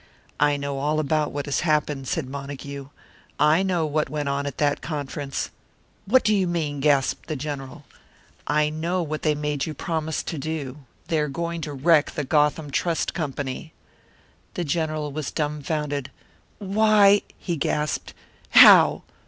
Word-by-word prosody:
"I 145 0 +3
know 140 -1 -3
all 150 +2 0
about 155 0 0
what 145 0 -4
has 145 - 0
happened," 150 -4 0
said 155 -2 -2
Montague. 140 0 -7 0.5
"I 155 +4 +4
know 180 -4 0
what 150 -1 -1
went 145 0 -2
on 140 +1 -1
at 140 - -6
that 145 -1 +1
conference." 145 -2 -4 0.6
"What 255 +5 +4
do 215 - +3
you 190 -2 +1
mean?" 155 -4 -2
gasped 140 -2 +1
the 155 - -3
General. 140 -2 -6 0.6
"I 150 +1 +2
know 170 +3 -1
what 155 -1 -4
they 155 -1 +1
made 150 -1 -2
you 155 - -5
promise 160 +1 -2
to 160 - -5
do. 145 -2 -4 0.3
They 160 - +2
are 150 - 0
going 170 +3 -3
to 150 -1 -5
wreck 150 +2 +3
the 150 - -2
Gotham 150 +1 +1
Trust 165 +4 0
Company." 145 -2 -4 0.8
The 175 - -1
General 155 -1 -2
was 150 -1 -4
dumfounded. 150 -2 -2 0.5
"Why!" 205 0 +4 0.2
he 175 - -3
gasped. 150 0 -2 0.3
"How? - - +8
150 Hz, 155 wpm, -24 LUFS, 140-160 Hz, 0.8 s, How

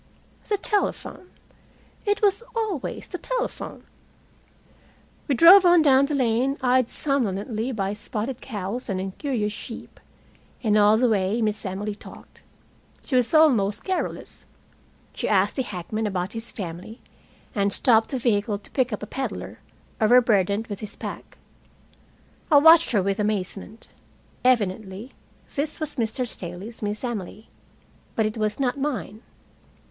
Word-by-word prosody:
The 415 - +2
telephone! 400 -2 -2 0.8
It 410 +1 +1
was 405 +2 +3
always 425 - -3
the 360 - -6
telephone. - - -4 1.4
We 280 - +1
drove 355 +9 +9
on 350 -2 +6
down 275 -1 +5
the 295 - -1
lane, 255 +2 +1
eyed 255 -1 +2
somnolently 230 -3 -1
by 200 -4 -2
spotted 225 +4 -4
cows 220 +1 -5
and 190 -1 -1
incurious 210 +3 -2
sheep, 230 +2 -9 0.6
and 215 -3 +2
all 210 +1 +5
the 250 +2 +3
way 205 0 +1
Miss 215 -2 -1
Emily 200 +3 -3
talked. 205 - -14 0.6
She 265 - -2
was 245 -1 +3
almost 235 -11 +4
garrulous. 375 -1 -4 0.7
She - - -3
asked 200 0 +2
the - - +2
hackman 215 0 -4
about 190 0 -3
his 225 +1 -7
family 185 +4 -7 0.5
and 200 -1 +1
stopped 225 0 +4
the 265 - -2
vehicle 210 -3 0
to 200 - -17
pick 255 -2 +1
up 210 - -4
a - - -2
peddler, 265 +5 -5 0.4
overburdened 215 -3 +4
with 205 -3 -6
his 210 - -7
pack. - - -8 1.1
I 295 - +8
watched 325 +3 +7
her 205 -5 +2
with 195 +1 -1
amazement. 210 +1 -3 0.5
Evidently 215 -2 0 0.4
this 295 +3 -3
was 310 -2 -4
Mr. 235 +2 -1
Staley's 195 +1 -8
Miss 210 +1 -3
Emily. 215 -3 -5 0.7
But 220 - +2
it 215 - -2
was 215 +2 -1
not 270 +1 0
mine. 245 -6 -3
225 Hz, 140 wpm, -24 LUFS, 205-270 Hz, 1.4 s, drove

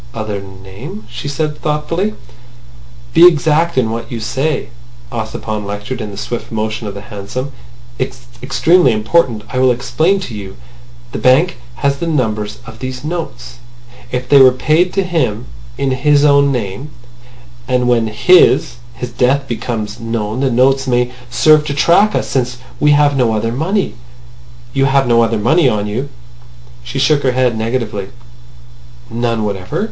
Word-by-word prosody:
"Other 110 -3 -4
name?" 95 +2 -10
she 120 +3 -6
said 150 +1 -2
thoughtfully. 165 +7 -1 1.0
"Be 175 - +9
exact 160 0 +2
in 115 -4 +2
what 115 0 -5
you 120 - -4
say," 135 +6 -2 0.4
Ossipon 110 -2 -4
lectured 105 +5 -5
in 105 - -5
the 100 - -9
swift 120 +3 -5
motion 110 0 -3
of 100 - -6
the 100 - -7
hansom. 115 +5 -6 0.5
"It's 130 -1 -4 0.2
extremely 135 +2 +3
important. 110 0 +1
I 130 - -2
will 130 0 +4
explain 125 +10 +1
to 130 - -7
you. 100 -2 -8 0.6
The - - -4
bank 150 +8 +3 0.2
has 140 +3 0
the 170 - -3
numbers 110 -8 -1
of 110 0 -11
these 130 0 -6
notes. 125 -7 -6 0.5
If 125 0 -3
they 140 +1 +6
were 130 -1 +8
paid 155 +7 +1
to 195 - +1
him 155 - -1 0.3
in 135 -1 0
his 145 +2 +3
own 140 -1 +4
name, 120 +3 -4 0.8
then 125 -1 +1
when 120 -2 +2
his—his 120 -2 +2
death 130 +3 +1
becomes 115 -2 -4
known, 115 0 -3
the 135 0 +1
notes 135 +2 +2
may 125 0 +1 0.2
serve 155 +4 +4
to 140 - -2
track 175 +8 +4
us - - -1
since 125 -2 -1 0.2
we 150 - +3
have 145 -1 +3
no 120 -4 +2
other 115 +2 -1
money. 165 - -1 0.8
You 135 -1 +2
have 135 0 +3
no 120 -1 +4
other 115 0 +1
money 145 +7 +3
on 105 -3 -1
you?" 115 +7 -3 0.7
She 120 +3 -6
shook 140 +2 +3
her 130 -2 +1
head 125 -2 +1
negatively. 110 -3 -2 1.0
"None 115 -1 -1
whatever?" 95 -3 -3
125 Hz, 160 wpm, -16 LUFS, 110-145 Hz, 1.0 s, Be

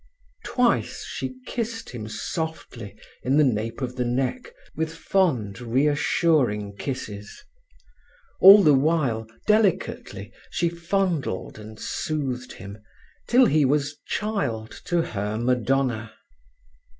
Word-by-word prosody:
Twice 250 -2 0
she - - -5
kissed 230 -1 -4
him 110 -3 -6
softly 120 - -5 0.3
in 135 +3 +1
the 150 - +6
nape 115 -2 -1
of 125 0 -4
the 125 - +1
neck, 130 - -2 0.2
with 160 0 -2
fond, 130 - 0
reassuring 130 - +1
kisses. 105 -6 -6 1.0
All 200 +1 +10
the 150 - +6
while, 135 -6 +1 0.2
delicately, 210 -3 0 0.2
she 170 - 0
fondled 170 - -2
and 110 +1 -11
soothed 130 -5 -3
him, 100 +2 -10 0.5
till 250 +1 +6
he 155 -8 +3
was 145 +1 0
child 155 - -2
to 175 -2 +1
her 105 -4 -3
Madonna. 125 -1 0
135 Hz, 110 wpm, -24 LUFS, 110-170 Hz, 1.0 s, All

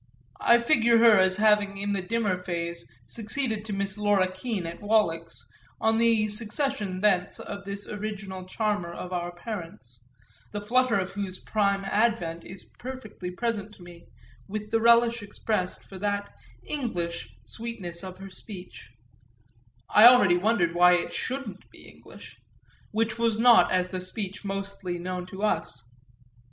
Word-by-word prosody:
I 235 - +6
figure 235 -2 +4
her 225 -3 +7
as 185 0 +3
having 210 -2 +3
in 200 +1 -1
the 195 - -1
dimmer 205 -1 -1
phase 170 -3 -5
succeeded 225 - -2
to 215 - -4
Miss 195 0 -3
Laura 205 -3 +3
Keene 190 -1 -4
at 165 +1 -7
Wallack's 170 -6 0 0.3
on 225 0 +2
the 230 -2 +3
secession 210 -3 -1
thence 195 -3 +2
of 200 0 -7
this 200 0 -6
original 200 -3 -6
charmer 205 -2 -2
of 180 +1 -7
our 175 0 -2
parents, 170 - -8 0.5
the 205 - -2
flutter 240 +1 +2
of 185 -1 -2
whose 195 -2 -4
prime 200 -2 0
advent 195 -6 0
is 190 0 -9 0.2
perfectly 240 -8 -7
present 215 +1 -3
to 180 - -15
me, 175 -1 -14 0.4
with 210 +1 -5
the 225 0 +2
relish 235 0 +5
expressed 205 -2 -3
for 190 - -11
that 205 0 -2 0.3
"English" 170 - -4
sweetness 180 - -5
of 185 -1 -7
her 195 0 -10
speech 185 - -10 1.0
(I 215 +3 +8
already 240 -8 +7
wondered 180 -3 +1
why 180 +1 +6
it 175 -1 0
shouldn't 255 -8 -4
be - - -15
English) - - -14 0.5
which 220 +1 -1
was 230 -2 +1
not 235 +1 +6
as 185 0 +1
the 185 -1 -4
speech 195 +1 -5
mostly 195 -2 -4
known 180 +1 -5
to 190 +2 -8
us. 160 - -1
200 Hz, 150 wpm, -27 LUFS, 180-220 Hz, 1.0 s, I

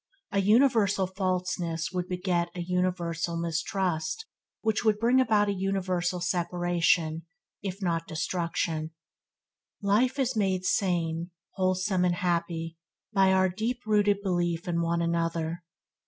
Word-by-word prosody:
A 200 - +1
universal 210 -3 +4
falseness 180 -3 -2
would 180 -1 -2
beget 180 -1 0
a 175 - -3
universal 175 -2 -1
mistrust 170 - -1 0.4
which 220 0 0
would 215 -2 +3
bring 240 +4 +4
about 215 -4 +3
a 200 - +1
universal 185 -2 -1
separation, 175 -2 +1 0.3
if 195 0 -5
not 165 -2 -1
destruction. 165 -1 -2 0.9
Life 225 +7 +2
is 260 -2 0
made 190 -3 0
sane, 170 -3 0 0.2
wholesome, 185 0 +1
and 175 -1 +2
happy, 170 -2 -2 0.3
by 195 -2 +5
our 190 0 +4
deep 225 +7 -2
rooted 205 -2 +2
belief 175 -3 -1
in 170 -1 0
one 170 0 0
another. 165 0 -1
180 Hz, 125 wpm, -28 LUFS, 170-200 Hz, 0.9 s, by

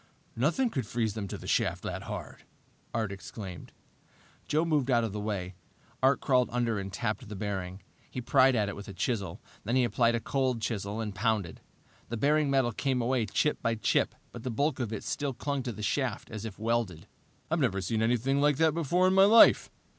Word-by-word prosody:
"Nothing 170 - +1
could 130 -7 -3
freeze 115 -3 -1
them 105 -2 -4
to - - -5
the - - -11
shaft - - 0
that - - -4
hard," - - -7 0.5
Art 110 -3 -1
exclaimed. 95 -3 -8 0.8
Joe 155 +3 +2
moved 150 -5 +1
out 120 -2 +3
of 110 -3 -3
the 105 - -3
way. 100 -3 -3 0.5
Art 135 +1 +4
crawled 125 -2 +3
under 120 -3 0
and 95 0 -5
tapped 110 +3 -3
the 105 - -6
bearing. 95 -2 -4 0.3
He - - -5
pried 130 +1 +4
at 105 -3 +1
it 100 - -4
with 100 - -9
a 100 - -8
chisel. 100 -2 -2 0.2
Then 115 +4 -1
he 130 - +4
applied 120 0 +2
a - - 0
cold 130 0 0
chisel 110 -1 -3
and 105 -2 -4
pounded. 100 -4 -1 0.5
The 115 - -3
bearing 150 +3 +2
metal 135 -3 +2
came 130 +3 -1
away 120 -2 +1
chip 150 - 0
by 115 0 +1
chip, 110 - +1 0.2
but 120 - -8
the 130 - -4
bulk 140 +4 0
of 120 -4 -2
it 110 - -5 0.3
clung 140 -2 -2
to 125 -1 -4
the 110 -1 -7
shaft 120 +1 -1
as 110 0 -6
if 105 -3 -7
welded. 110 -7 -1 0.5
"I've 165 - +2
never 110 -9 +1
seen 110 +4 -1
anything 125 +4 +1
like 145 -1 +3
that 160 -1 +3
before 170 +3 +2
in 185 - +3
my 195 0 +7
life!" 225 +3 +7
115 Hz, 205 wpm, -29 LUFS, 105-135 Hz, 0.8 s, my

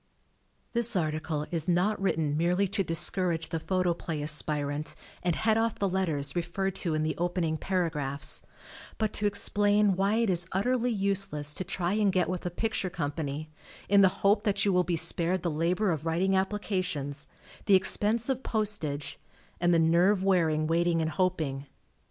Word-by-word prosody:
This 235 -1 +4
article 155 -2 -2
is 165 -2 -1
not 185 +4 +1
written 160 -6 0
merely 175 +5 +1
to 200 0 0
discourage 165 0 +2
the 165 - -2
Photoplay 170 -3 -2
aspirant 150 0 -1 0.3
and 175 -2 0
head 220 0 +1
off 225 -1 0
the 200 - 0
letters 160 -7 -1
referred 190 +2 -2
to 170 -5 -1
in 155 - 0
the 155 0 -1
opening 175 -2 -1
paragraphs, 155 -6 0 0.6
but 215 -1 -1
to 205 - 0
explain 205 0 +3
why 195 +3 +1
it 230 -3 +1
is 175 -1 -1
utterly 245 +5 0
useless 195 -8 +1
to 185 - -3
try 180 0 -2
and 210 -2 +2
get 185 -2 +1
with 180 -1 -3
a - - -1
picture 210 +1 -2
company 155 -2 -4 0.4
in 200 0 +5
the 190 - +6 0.2
hope 205 +2 +4
that 205 -1 +1
you 200 - +2
will 180 0 +3
be 175 -1 -1
spared 170 +2 +2
the 170 - -1
labor 175 +6 0
of 160 0 -3
writing 175 +4 +1
applica 195 0 0
tions; 145 -4 -4 0.4
the 200 - +6
expense 210 +4 +1
of 265 -1 -1
postage 205 - -3 0.4
and 175 0 +2
the 170 - +4
nerve 175 +4 +3
wearing 165 -5 +2
waiting 165 +1 +1
and 160 0 -1
hoping. 155 -7 -2
180 Hz, 170 wpm, -28 LUFS, 160-200 Hz, 0.6 s, the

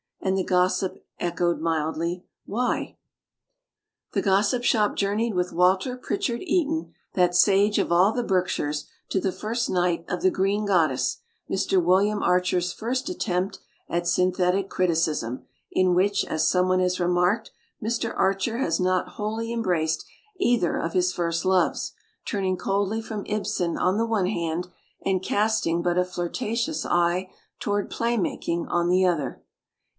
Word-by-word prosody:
And 190 0 0
the 190 - +1
Gossip 185 +1 +1 0.2
echoed 175 0 0
mildly, 165 +2 -1 0.2
"Why?" 245 +5 -2 1.2
The - - +1
Gossip 200 +5 +2
Shop 215 -4 +2
journeyed 210 +3 0
with 180 0 0
Walter 185 +7 +2
Prichard 250 -3 -2
Eaton, 320 -3 0 0.2
that 180 -1 +2
sage 200 +3 +4
of - - 0
all 180 +4 +5
the 245 +1 -1
Berkshires, 180 -7 -1 0.2
to 195 - +1
the 190 0 0
first 230 +5 -2
night 175 -2 +1
of 180 - -3
"The 185 - +4
Green 200 +3 0
Goddess", 155 -10 +2 0.3
Mr. 190 -1 +2
William 200 +4 +3
Archer's 180 0 +2
first 255 +6 -2
attempt 190 - -2 0.3
at 175 0 -1
synthetic 180 +2 +1
criticism, 160 -10 0 0.3
in 185 -1 +3
which, 200 +3 +2
as 155 0 0
someone 185 0 +2
has 180 0 +1
remarked, 180 +5 +1 0.3
Mr. 230 +1 -1
Archer 195 +4 +1
has 165 -11 0
not 185 0 +1
wholly 220 +2 -3
embraced 175 -9 0 0.3
either 240 - +2
of 165 - -3
his 180 0 +2
first 170 0 -1
loves, 185 -1 +1 0.3
turn 200 -4 -2
ing 185 0 0
coldly 200 +3 -1
from 215 -2 -6
Ibsen 190 -5 -1
on 185 +2 +1
the 230 +1 +1
one 210 -5 +1
hand 170 -2 -2 0.4
and 190 -2 +1
casting 205 -5 +1
but 175 0 +1
a 180 - +3
flirtatious 230 - -2
eye 175 +2 +1 0.3
toward 205 -1 -1
"Play 235 +1 0
Making" 170 -3 -2
on 175 0 +1
the 185 +1 +4
other. 160 -7 -1
185 Hz, 150 wpm, -25 LUFS, 175-210 Hz, 1.2 s, all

